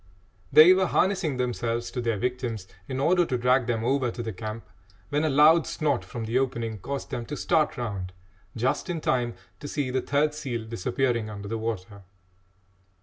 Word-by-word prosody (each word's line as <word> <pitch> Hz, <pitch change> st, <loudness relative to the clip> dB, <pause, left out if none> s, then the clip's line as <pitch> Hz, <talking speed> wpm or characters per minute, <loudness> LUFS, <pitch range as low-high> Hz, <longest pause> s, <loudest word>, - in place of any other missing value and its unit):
They 155 Hz, +6 st, +9 dB
were 190 Hz, 0 st, +2 dB
harnessing 175 Hz, -9 st, +1 dB
themselves 120 Hz, -2 st, -2 dB
to 125 Hz, -, -3 dB
their 115 Hz, -2 st, 0 dB
victims 120 Hz, -3 st, -3 dB, 0.2 s
in 130 Hz, 0 st, -3 dB
order 175 Hz, +5 st, +4 dB
to 130 Hz, -7 st, -1 dB
drag 125 Hz, 0 st, +2 dB
them 115 Hz, -2 st, -1 dB
over 130 Hz, 0 st, +1 dB
to 120 Hz, +1 st, -5 dB
the 110 Hz, -1 st, -4 dB
camp, 110 Hz, +3 st, -6 dB, 0.4 s
when 145 Hz, +2 st, 0 dB
a 155 Hz, -, +2 dB
loud 155 Hz, +4 st, +5 dB
snort 145 Hz, -5 st, 0 dB
from 115 Hz, -2 st, -6 dB
the 115 Hz, +4 st, +1 dB
opening 115 Hz, -5 st, -2 dB
caused 140 Hz, +9 st, -5 dB
them 120 Hz, -, -3 dB
to 150 Hz, -, -5 dB
start 155 Hz, -2 st, +1 dB
round 100 Hz, -7 st, -4 dB, 0.4 s
just 125 Hz, +9 st, -1 dB
in 170 Hz, -2 st, -2 dB
time 120 Hz, -5 st, 0 dB, 0.2 s
to 145 Hz, -, -7 dB
see 140 Hz, -3 st, -2 dB
the 130 Hz, 0 st, 0 dB
third 150 Hz, +2 st, +1 dB
seal 130 Hz, -7 st, -4 dB
disappearing 115 Hz, +1 st, -1 dB
under 100 Hz, -1 st, -7 dB
the 115 Hz, +2 st, -3 dB
water. 100 Hz, -3 st, -4 dB
125 Hz, 185 wpm, -26 LUFS, 115-145 Hz, 0.4 s, They